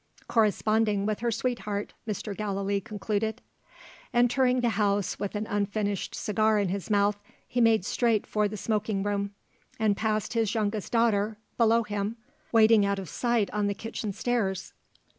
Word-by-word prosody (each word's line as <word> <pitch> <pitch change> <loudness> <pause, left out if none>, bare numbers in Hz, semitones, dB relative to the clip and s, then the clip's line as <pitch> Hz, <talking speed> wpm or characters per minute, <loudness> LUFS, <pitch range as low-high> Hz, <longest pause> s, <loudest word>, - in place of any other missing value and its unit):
"Corresponding 215 -2 +2
with 215 0 -1
her 235 +1 0
sweetheart," 220 -3 -2
Mr. 210 -1 -3
Gallilee 200 -1 -1
concluded. 215 +2 -2 0.8
Entering 250 +1 +3
the 240 - +2
house 205 -2 0
with 205 +1 -3
an 210 +1 -2
unfinished 205 -1 -2
cigar 215 +1 +2
in 200 -3 +1
his 195 +2 -4
mouth, 205 0 +2 0.3
he 245 - 0
made 225 -5 +4
straight 230 -3 +1
for 210 -1 +1
the 210 +1 -6
smoking 210 -1 -1
room 200 0 -2 0.4
and 215 -2 +2
passed 215 0 -1
his 225 -2 +1
youngest 210 -2 -1
daughter, 220 -2 +2 0.2
below 230 0 +4
him, 210 +1 -3 0.3
waiting 220 -2 +6
out 200 0 +1
of 190 -4 -6
sight 235 -2 0
on 210 -1 0
the 200 - -1
kitchen 225 -1 -4
stairs. 195 -4 -1
210 Hz, 155 wpm, -28 LUFS, 200-225 Hz, 0.8 s, waiting